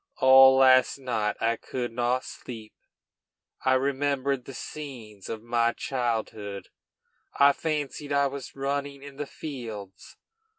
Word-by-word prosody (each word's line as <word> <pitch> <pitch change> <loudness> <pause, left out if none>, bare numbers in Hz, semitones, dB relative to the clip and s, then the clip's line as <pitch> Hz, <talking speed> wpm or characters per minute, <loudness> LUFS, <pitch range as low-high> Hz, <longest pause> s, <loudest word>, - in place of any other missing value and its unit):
All 130 0 +8
last 130 0 +5
night 115 -6 -1
I 115 0 +1
could 125 0 -4
not 125 +2 0
sleep; 110 -3 -9 0.9
I 130 0 +4
remembered 140 -1 0
the 135 - -9
scenes 115 -10 -8
of 110 -1 -5
my 115 0 +1
childhood; 110 -5 -3 0.7
I 140 0 +7
fancied 150 -1 -3
I 140 0 +3
was 140 0 -5
running 140 0 -3
in 140 -1 -11
the 145 -1 -4
fields. 115 -12 -8
130 Hz, 125 wpm, -27 LUFS, 115-140 Hz, 0.9 s, All